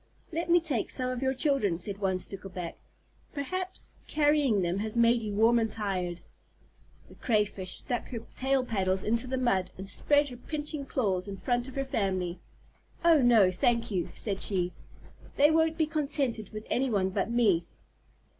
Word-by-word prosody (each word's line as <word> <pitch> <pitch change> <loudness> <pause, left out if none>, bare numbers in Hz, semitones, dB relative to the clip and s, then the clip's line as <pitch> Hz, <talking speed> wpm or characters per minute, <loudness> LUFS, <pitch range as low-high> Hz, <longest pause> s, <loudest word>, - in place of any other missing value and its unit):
"Let 335 +1 -3
me 350 +1 +6
take 295 -9 -2
some 255 -1 -1
of 255 0 -4
your 265 0 0
children," 260 - +2
said 195 +3 -1
one 190 -2 0
Stickleback. 185 -2 -5 0.6
"Perhaps 370 +6 -3
carrying 290 -9 +2
them 175 +2 -1
has 220 +2 -3
made 235 0 +4
you 210 -2 -4
warm 230 +3 +4
and 225 -1 0
tired." 185 -5 -3 0.9
The - - -16
Crayfish 210 -5 0
stuck 245 - -3
her 235 -3 -5
tail 265 0 +1
paddles 190 -4 0
into 230 +3 0
the 260 +1 -2
mud, 195 -8 +1
and 190 +1 -7
spread 290 +7 +2
her 245 - -9
pinching 295 +1 -4
claws 195 -9 0
in 195 -1 -6
front 245 +5 -1
of 265 - -10
her 275 0 -1
family. 185 -7 -1 0.7
"Oh 330 -4 +6
no, 225 -7 +5
thank 230 +5 +1
you," 180 -4 -1
said 200 -3 -2
she. 180 -3 +1 0.6
"They 290 +2 +6
won't 320 0 +2
be 320 - +3
contented 280 - -1
with 215 0 -8
any 265 +2 +1
one 190 -4 +1
but 195 +3 -1
me." 215 -8 +2
230 Hz, 175 wpm, -29 LUFS, 195-270 Hz, 0.9 s, me